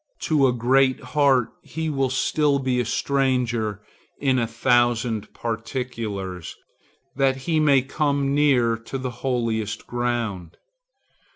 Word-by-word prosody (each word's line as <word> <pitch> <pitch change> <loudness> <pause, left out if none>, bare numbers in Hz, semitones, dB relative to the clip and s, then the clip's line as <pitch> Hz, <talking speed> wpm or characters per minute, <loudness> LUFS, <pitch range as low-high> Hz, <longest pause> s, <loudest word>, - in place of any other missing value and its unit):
To 145 -4 +3
a - - +3
great 130 +2 +2
heart 135 -2 +2
he 160 0 -5
will 135 -3 0
still 145 +2 +1
be 130 -2 0
a 125 - 0
stranger 120 -5 0 0.4
in 130 -2 +2
a 115 - 0
thousand 120 -1 +1
particulars, 115 - -4 0.6
that 135 -1 +2
he 160 -2 +1
may 140 -4 +4
come 140 0 0
near 130 -6 +3
in 135 - -3
the 130 - -2
holiest 115 -4 -2
ground. 115 -8 -3
125 Hz, 120 wpm, -23 LUFS, 115-135 Hz, 0.6 s, may